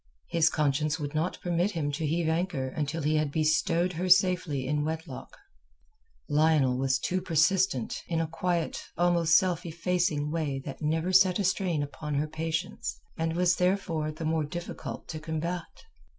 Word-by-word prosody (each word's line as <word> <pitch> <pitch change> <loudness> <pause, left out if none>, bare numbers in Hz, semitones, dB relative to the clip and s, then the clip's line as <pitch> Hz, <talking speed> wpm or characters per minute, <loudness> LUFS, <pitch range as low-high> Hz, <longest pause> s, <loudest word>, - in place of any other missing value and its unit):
His 165 -2 +3
conscience 150 +1 0
would 145 -1 -4
not 160 +4 -1
permit 175 +2 +1
him 150 -4 -1
to 150 +2 -2
heave 165 +2 0
anchor 160 -5 -1
until 150 +3 -3
he 155 +1 +2
had 150 -2 0
bestowed 165 +3 +1
her 180 +3 -2
safely 180 -7 +3
in 150 +2 0
wedlock. 160 +1 -6 0.9
Lionel 150 -3 +3 0.3
too 185 - 0
was - - -9
persistent, 165 -5 +1
in 165 -1 -1
a 165 - +1
quiet, 170 0 -2
almost 170 -2 +4
self 180 -2 0
effacing 170 -3 -1
way 150 -4 -1
that 135 - -7
never 160 +4 0
set 185 -1 +5
a 205 - 0
strain 180 -5 0
upon 145 +1 -5
her 150 +2 0
patience, 160 +5 -3 0.2
and 165 0 -1
was 180 0 +3
therefore 180 -4 0
the 155 +1 -6
more 160 0 +1
difficult 170 +4 -6
to 155 - -5
combat. 165 +2 -4
160 Hz, 165 wpm, -28 LUFS, 150-175 Hz, 0.9 s, set